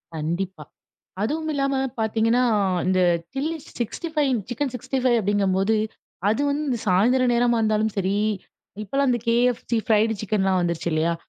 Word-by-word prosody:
கண்டிப்பா. 170 +2 -3 0.6
அதுவும் 315 +8 -1
இல்லாம 275 -1 0 0.3
பார்த்தீங்கன்னா, 225 +2 +2 0.4
இந்த 185 0 +2 0.3
சில்லி 310 +4 -2 0.2
65 300 +4 -1 0.2
சிக்கன் 265 +1 -2
65 255 0 0
அப்பிடிங்கம்போது, 200 +1 +1 0.5
அது 220 +6 +1
வந்து 285 -3 -1
சாயந்தரம் 245 +7 +3
நேரமா 240 -1 +2
இருந்தாலும் 215 -1 +1
சரி, 195 0 0 0.7
இப்பலாம் 275 +6 0
இந்த 240 -1 0
கேஎஃப்சி, 235 0 +1
ஃப்ரைட் 220 0 +3
சிக்கன்லாம் 195 -3 +1
வந்துருச்சு 170 -1 -1
இல்லயா! 160 +2 +1
225 Hz, 120 wpm, -23 LUFS, 195-255 Hz, 0.7 s, சாயந்தரம்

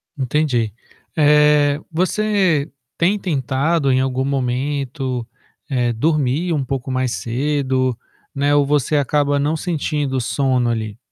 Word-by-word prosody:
Entendi. 130 -5 0 0.4
Eh, 150 -1 +4
você 185 -3 +1 0.3
tem 190 +5 +2
tentado 140 -1 0
em 130 - +3
algum 130 0 -1
momento, 130 -1 -2 0.4
eh, 125 -3 +1
dormir 155 +5 0
um 140 -3 0
pouco 130 0 -4
mais 130 -1 0
cedo, 130 0 -1 0.4
né, 145 +1 +1
ou 145 -1 +4
você 150 +1 +1
acaba 145 +1 +1
não 150 +3 0
sentindo 150 -5 -2
sono, 130 -1 +1
ali? 110 -2 -3
140 Hz, 120 wpm, -19 LUFS, 130-150 Hz, 0.4 s, Eh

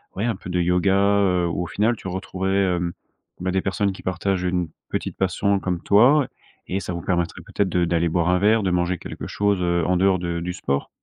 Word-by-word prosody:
ouais 100 - -1
un 115 -4 0
peu 95 - -9
de 90 0 0
yoga, 90 +2 +2
heu, 100 -3 +3
où 85 +1 -2
au - - -5
final 105 +10 +1
tu - - -8
retrouverais, 95 0 0
hem, 85 0 -2 0.5
bah, 95 0 -1
des 95 0 +1
personnes 100 +1 0
qui 95 - -10
partagent 95 0 -1
une 90 -2 -1 0.2
petite - - -3
passion 100 +1 +1
comme 90 -2 -2
toi 125 +7 +5 0.4
et 95 - -1
ça 90 - -5
vous 85 - -4
permettrait 85 -1 -1
peut-être 100 -2 -1
de 90 -1 +1
d'aller 85 0 +1
boire 85 +1 +1
un 90 - +4
verre, 110 +3 +4
de 95 - +1
manger 90 0 0
quelque - - -7
chose, 100 -2 0
heu, 85 -1 +1
en 90 0 +2
dehors 95 -1 +3
de 85 -1 -2
du 90 +1 -4
sport. 70 -6 -2
90 Hz, 230 wpm, -23 LUFS, 90-100 Hz, 0.5 s, toi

